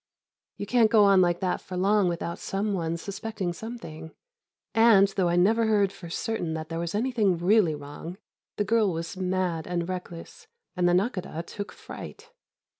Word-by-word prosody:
You -, -, -4 dB
can't 225 Hz, +1 st, +4 dB
go 215 Hz, -2 st, +6 dB
on 195 Hz, -2 st, +6 dB
like 175 Hz, -1 st, +1 dB
that 185 Hz, -1 st, -1 dB
for 185 Hz, -, -7 dB
long 195 Hz, 0 st, +3 dB
without 170 Hz, 0 st, -4 dB
some 200 Hz, +2 st, -2 dB
one 165 Hz, -3 st, -2 dB
suspecting 200 Hz, 0 st, -4 dB
something, 170 Hz, -7 st, -8 dB, 0.6 s
and, 225 Hz, -3 st, +6 dB
though 190 Hz, -3 st, 0 dB
I 170 Hz, -, +1 dB
never 220 Hz, +6 st, +3 dB
heard 205 Hz, -3 st, +3 dB
for 175 Hz, -3 st, -10 dB
certain 175 Hz, -3 st, -2 dB
that 155 Hz, 0 st, -6 dB
there 165 Hz, 0 st, -3 dB
was 170 Hz, +2 st, -3 dB
anything 215 Hz, -5 st, +1 dB
really 175 Hz, -2 st, +3 dB
wrong, 145 Hz, +5 st, -8 dB, 0.4 s
the 210 Hz, -, +1 dB
girl 215 Hz, -1 st, +2 dB
was 165 Hz, +2 st, -5 dB
mad 185 Hz, -3 st, -1 dB
and 175 Hz, -1 st, -2 dB
reckless, 180 Hz, -2 st, -7 dB, 0.3 s
and 180 Hz, -1 st, +2 dB
the -, -, +3 dB
Nakhôdah 185 Hz, -4 st, -1 dB
took 205 Hz, +2 st, -7 dB
fright. 460 Hz, +2 st, -10 dB
185 Hz, 175 wpm, -27 LUFS, 170-210 Hz, 0.6 s, go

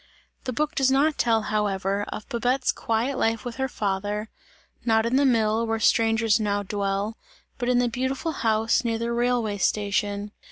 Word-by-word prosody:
The 255 Hz, -, -2 dB
book 305 Hz, +5 st, -1 dB
does 270 Hz, -4 st, +2 dB
not 280 Hz, +3 st, +2 dB
tell, 225 Hz, -2 st, +2 dB
however, 200 Hz, -1 st, -1 dB
of 210 Hz, -, -7 dB
Babette's 250 Hz, +1 st, +1 dB
quiet 235 Hz, +4 st, -1 dB
life 225 Hz, 0 st, 0 dB
with 245 Hz, 0 st, -5 dB
her 265 Hz, 0 st, 0 dB
father; 205 Hz, -1 st, -3 dB, 0.5 s
not 220 Hz, -1 st, +2 dB
in 235 Hz, +2 st, +1 dB
the 280 Hz, 0 st, +4 dB
mill, 225 Hz, -2 st, +2 dB
where 225 Hz, 0 st, -1 dB
strangers 225 Hz, -1 st, +3 dB
now 205 Hz, -1 st, 0 dB
dwell, 200 Hz, +2 st, -2 dB, 0.4 s
but 245 Hz, -1 st, -1 dB
in 250 Hz, -, +3 dB
the 245 Hz, 0 st, +3 dB
beautiful 260 Hz, +7 st, -2 dB
house, 225 Hz, -2 st, +1 dB
near 230 Hz, -1 st, 0 dB
the 235 Hz, +1 st, -2 dB
railway 235 Hz, -3 st, 0 dB
station. 205 Hz, 0 st, 0 dB
225 Hz, 170 wpm, -25 LUFS, 210-245 Hz, 0.5 s, the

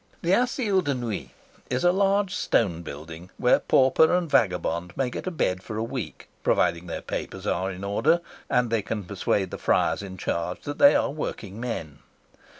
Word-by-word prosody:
The 170 Hz, -, +1 dB
Asile 225 Hz, -3 st, +2 dB
de 145 Hz, -3 st, 0 dB
Nuit 110 Hz, -, -4 dB, 0.4 s
is 125 Hz, +3 st, -1 dB
a 175 Hz, -, +6 dB
large 195 Hz, 0 st, +2 dB
stone 90 Hz, -, +1 dB
building 80 Hz, +3 st, -9 dB
where 125 Hz, -, +4 dB
pauper 135 Hz, +4 st, +4 dB
and 180 Hz, -1 st, 0 dB
vagabond 90 Hz, -, 0 dB
may 130 Hz, -2 st, 0 dB
get -, -, -6 dB
a -, -, +2 dB
bed 95 Hz, -, -1 dB
for 105 Hz, +2 st, -6 dB
a 110 Hz, -, -1 dB
week, 115 Hz, -, -6 dB
provided 85 Hz, +1 st, +1 dB
their 85 Hz, -, -5 dB
papers -, -, -5 dB
are 95 Hz, +1 st, 0 dB
in 95 Hz, 0 st, -7 dB
order 145 Hz, +12 st, +2 dB, 0.3 s
and 125 Hz, -2 st, +2 dB
they 115 Hz, -2 st, +2 dB
can 105 Hz, +1 st, -4 dB
persuade 95 Hz, 0 st, -1 dB
the -, -, -6 dB
friars -, -, +2 dB
in 95 Hz, -2 st, -8 dB
charge 85 Hz, 0 st, -2 dB
that 145 Hz, -, -6 dB
they 285 Hz, -, +8 dB
are -, -, +2 dB
workingmen. 105 Hz, -, -5 dB
115 Hz, 180 wpm, -26 LUFS, -, 0.4 s, they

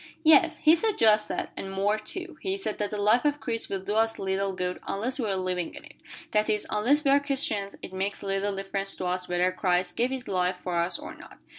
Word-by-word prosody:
"Yes, 315 Hz, -1 st, +5 dB
he 310 Hz, -, +7 dB
said 420 Hz, +5 st, +2 dB
just 215 Hz, -1 st, +4 dB
that, -, -, -3 dB
and 195 Hz, -, -6 dB
more, 200 Hz, +3 st, +1 dB
too. 345 Hz, -, -7 dB
He 385 Hz, 0 st, -2 dB
said 300 Hz, -, -4 dB
that 205 Hz, -1 st, -1 dB
the 210 Hz, -, -4 dB
life 210 Hz, +4 st, +3 dB
of 295 Hz, 0 st, +1 dB
Christ 230 Hz, -4 st, -3 dB
will 195 Hz, -1 st, -3 dB
do 205 Hz, -, -3 dB
us 225 Hz, +1 st, +2 dB
little 195 Hz, 0 st, -1 dB
good 180 Hz, -1 st, -3 dB
unless 245 Hz, +7 st, -1 dB
we 225 Hz, -4 st, -1 dB
are 195 Hz, -, 0 dB
living 185 Hz, -2 st, -2 dB
in -, -, -10 dB
it; -, -, -13 dB, 0.4 s
that 210 Hz, 0 st, +2 dB
is, 210 Hz, -1 st, 0 dB
unless 255 Hz, +8 st, +2 dB
we 275 Hz, -, +5 dB
are 280 Hz, -, +6 dB
Christians, 275 Hz, -8 st, -2 dB
it -, -, -8 dB
makes 195 Hz, +2 st, -3 dB
little 195 Hz, 0 st, -1 dB
difference 195 Hz, 0 st, -3 dB
to 185 Hz, -, -5 dB
us 180 Hz, 0 st, -2 dB
whether 180 Hz, +1 st, +2 dB
Christ 180 Hz, -1 st, 0 dB
gave 245 Hz, +2 st, +1 dB
His 260 Hz, -1 st, -4 dB
life 180 Hz, -1 st, 0 dB
for 180 Hz, -1 st, -3 dB
us 170 Hz, 0 st, +2 dB
or -, -, -8 dB
not." -, -, -14 dB
205 Hz, 245 wpm, -27 LUFS, 190-250 Hz, 0.4 s, he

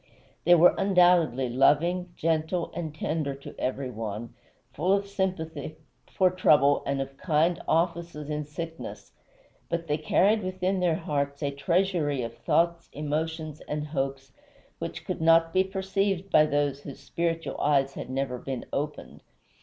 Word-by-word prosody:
They 175 Hz, +1 st, +7 dB
were 175 Hz, +1 st, +7 dB
undoubtedly 175 Hz, -9 st, +4 dB
loving, 160 Hz, +8 st, +2 dB
gentle, 165 Hz, +2 st, -1 dB
and 165 Hz, -3 st, -4 dB
tender 155 Hz, -3 st, -2 dB
to 140 Hz, -, -10 dB
every 130 Hz, 0 st, -2 dB
one, 110 Hz, 0 st, -5 dB, 0.4 s
full 185 Hz, +2 st, +1 dB
of 200 Hz, 0 st, +1 dB
sympathy 185 Hz, -5 st, -3 dB, 0.4 s
for 185 Hz, -1 st, +3 dB
trouble 145 Hz, -6 st, +4 dB
and 140 Hz, 0 st, 0 dB
of 135 Hz, 0 st, -5 dB
kind 165 Hz, +1 st, +1 dB
offices 170 Hz, -2 st, 0 dB
in 150 Hz, 0 st, -3 dB
sickness, 165 Hz, +2 st, -7 dB, 0.6 s
but 170 Hz, 0 st, -2 dB
they 150 Hz, -1 st, -1 dB
carried 205 Hz, +7 st, +3 dB
within 185 Hz, 0 st, -1 dB
their 175 Hz, -3 st, +2 dB
hearts 140 Hz, -2 st, -2 dB
a 140 Hz, -, 0 dB
treasury 155 Hz, -2 st, 0 dB
of 115 Hz, 0 st, -5 dB
thoughts, 170 Hz, 0 st, +1 dB
emotions, 155 Hz, +1 st, -3 dB
and 150 Hz, 0 st, -3 dB
hopes, 135 Hz, -2 st, -3 dB, 0.5 s
which -, -, -6 dB
could -, -, -4 dB
not 165 Hz, 0 st, +4 dB
be 190 Hz, 0 st, +4 dB
perceived 195 Hz, 0 st, -1 dB
by 155 Hz, 0 st, +6 dB
those 145 Hz, -1 st, 0 dB
whose 140 Hz, -2 st, -9 dB
spiritual 165 Hz, +3 st, -3 dB
eyes 140 Hz, -2 st, +2 dB
had -, -, -7 dB
never 130 Hz, -1 st, -2 dB
been 130 Hz, -2 st, -5 dB
opened. 150 Hz, +1 st, -4 dB
160 Hz, 145 wpm, -27 LUFS, 140-175 Hz, 0.6 s, They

